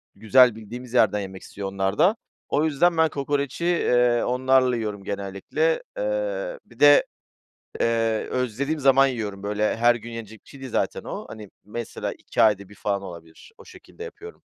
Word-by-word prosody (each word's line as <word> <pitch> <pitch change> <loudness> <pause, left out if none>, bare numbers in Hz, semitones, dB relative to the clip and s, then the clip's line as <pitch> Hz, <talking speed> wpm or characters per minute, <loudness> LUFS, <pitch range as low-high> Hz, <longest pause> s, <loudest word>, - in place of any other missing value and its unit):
güzel, 125 +1 +5
bildiğimiz 120 +3 -9
yerden 105 -4 +3
yemek 95 -1 -7
istiyor 100 -1 -7
onlar 95 0 -2
da. 200 +6 +4 0.3
O 150 +2 +1
yüzden 165 +3 +2
ben 160 -1 +4
kokoreci, 140 +2 -2
eee, 125 -8 +2
onlarla 130 0 +2
yiyorum 105 -4 -4
genellikle. 100 - -2
Eee, - - -2
bir - - -20
de, - - +7 0.8
eee, 115 -1 +1
özlediğim 130 +5 -2
zaman 135 0 +5
yiyorum, 105 -6 -4
böyle, 105 +1 -1
her 120 +1 +4
gün 120 0 -8
yenilecek 110 -1 -9
bir - - -22
şey 140 - -13
değil 130 -3 -8
zaten - - -1
o. - - -6
Hani, 105 -3 -10
mesela 115 +3 -5
2 - - -2
ayda 100 -3 +3
1 105 - -15
falan 100 -1 -2
olabilir. 85 - -12
O - - -14
şekilde 450 - -12
yapıyorum. 440 -1 -11
120 Hz, 170 wpm, -24 LUFS, 105-145 Hz, 0.8 s, de